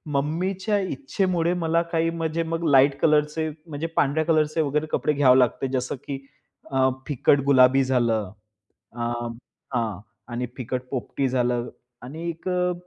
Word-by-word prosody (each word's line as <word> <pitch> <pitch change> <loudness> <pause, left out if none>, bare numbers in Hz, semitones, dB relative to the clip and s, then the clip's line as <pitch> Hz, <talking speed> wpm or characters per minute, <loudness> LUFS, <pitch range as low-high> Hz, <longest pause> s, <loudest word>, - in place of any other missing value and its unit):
मम्मीच्या 185 +8 0
इच्छेमुळे 185 - -1
मला 165 0 +2
काही 165 -1 +1
म्हणजे 165 0 -2
मग 165 +1 -3
लाईट 140 0 +5
कलरचे 150 +1 +2 0.2
म्हणजे 155 +1 -4
पांढऱ्या 150 +3 +2
कलरचे 155 0 +2
वगैरे 150 +1 0
कपडे 150 - +1
घ्यावे 130 -3 +5
लागते. 125 +2 +1
जसं 130 0 -2
की, 140 - -3 0.5
अ 130 -1 +3 0.2
फिकट 145 0 +3
गुलाबी 135 -1 +5
झालं, 115 -6 +1 0.6
आ, 120 0 -2 0.6
हां. 115 -6 -1 0.3
आणि 120 +1 -2
फिकट 125 0 -3
पोपटी 135 +1 -2
झालं 125 -1 0 0.3
आणि 160 +7 -5
एक 165 +2 -7
अ, 180 0 +1
145 Hz, 140 wpm, -24 LUFS, 130-165 Hz, 0.6 s, लाईट